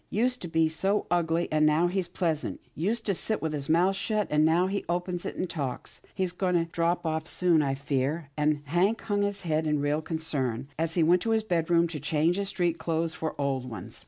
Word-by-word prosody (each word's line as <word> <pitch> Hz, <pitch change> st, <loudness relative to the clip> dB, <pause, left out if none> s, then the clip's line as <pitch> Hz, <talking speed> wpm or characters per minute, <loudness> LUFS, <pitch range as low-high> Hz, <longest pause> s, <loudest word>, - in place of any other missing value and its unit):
Used 250 Hz, +4 st, 0 dB
to 175 Hz, -, -4 dB
be 160 Hz, -1 st, +2 dB
so 195 Hz, +6 st, 0 dB
ugly, 170 Hz, -1 st, +1 dB
and 155 Hz, 0 st, +3 dB
now 155 Hz, +3 st, +4 dB
he's 180 Hz, 0 st, 0 dB
pleasant. 165 Hz, -3 st, -2 dB
Used 220 Hz, +8 st, -1 dB
to 200 Hz, -, +1 dB
sit 215 Hz, +4 st, -1 dB
with 160 Hz, -1 st, -2 dB
his 140 Hz, -1 st, -2 dB
mouth 180 Hz, +4 st, +4 dB
shut, 210 Hz, +1 st, 0 dB
and 150 Hz, 0 st, +4 dB
now 165 Hz, +3 st, +4 dB
he 200 Hz, +2 st, -2 dB
opens 175 Hz, 0 st, -2 dB
it, -, -, -5 dB
and 185 Hz, -, -2 dB
talks. 140 Hz, -7 st, -4 dB
He's 185 Hz, -2 st, 0 dB
going 180 Hz, -1 st, 0 dB
to 165 Hz, -1 st, +2 dB
drop 170 Hz, +1 st, -1 dB
off 160 Hz, 0 st, -1 dB
soon, 175 Hz, -3 st, +3 dB
I 135 Hz, -2 st, 0 dB
fear," 140 Hz, +2 st, -2 dB
and 150 Hz, -1 st, +1 dB
Hank 180 Hz, +9 st, +1 dB
hung 205 Hz, -2 st, 0 dB
his 200 Hz, -1 st, -1 dB
head 160 Hz, -1 st, 0 dB
in 150 Hz, 0 st, +2 dB
real 145 Hz, +2 st, 0 dB
concern, 140 Hz, -7 st, -2 dB
as 165 Hz, 0 st, -1 dB
he 170 Hz, -, +4 dB
went 175 Hz, +3 st, +4 dB
to 230 Hz, -, -2 dB
his 220 Hz, -1 st, +2 dB
bedroom 170 Hz, -3 st, +2 dB
to 155 Hz, -2 st, -5 dB
change 155 Hz, +4 st, +1 dB
his 200 Hz, -1 st, -1 dB
street 175 Hz, -2 st, 0 dB
clothes 165 Hz, 0 st, -1 dB
for 160 Hz, -2 st, -4 dB
old 135 Hz, -3 st, -1 dB
ones. 105 Hz, -6 st, -8 dB
165 Hz, 225 wpm, -28 LUFS, 155-180 Hz, -, now